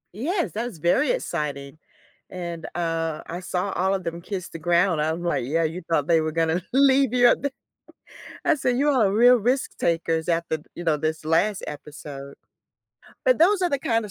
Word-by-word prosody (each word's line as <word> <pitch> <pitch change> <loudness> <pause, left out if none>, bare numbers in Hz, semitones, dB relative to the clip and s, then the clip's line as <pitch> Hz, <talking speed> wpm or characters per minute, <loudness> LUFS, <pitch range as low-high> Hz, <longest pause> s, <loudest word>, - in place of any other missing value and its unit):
Yes, 340 - -1
that 225 +3 -3
was 190 - -9
very 175 - +2
exciting, 150 - -3 0.5
and, 170 -3 -6
uh, 165 -2 -2
I 175 +2 -6
saw 185 +1 -2
all 190 +2 +1
of 190 - -4
them 170 0 -5
kiss 185 -1 -5
the 165 - -8
ground. 175 0 +2
I'm 160 +3 -1
like, 170 - 0
"Yeah, 165 +5 0
you 165 +3 -3
thought 150 -4 +1
they 165 -2 +4
were 155 0 -2
gonna 165 +2 0
leave 270 -1 +4
you 245 -1 +6
up - - +2
there." 280 -1 -1 1.0
I - - +5
said 250 -3 0
"You 290 +1 +2
are 225 -9 +3
real 245 +4 +6
risk 245 +4 -1
takers 165 -1 0
after, 170 -2 0 0.2
you 175 - -7
know, 160 -3 +2
this 155 +1 -2
last 185 +6 +1
episode." 145 -2 -9 0.9
But - - +5
those 380 +4 +4
are 360 - +2
the 280 - 0
kind 230 -6 0
of - - -11
175 Hz, 195 wpm, -24 LUFS, 160-245 Hz, 1.0 s, you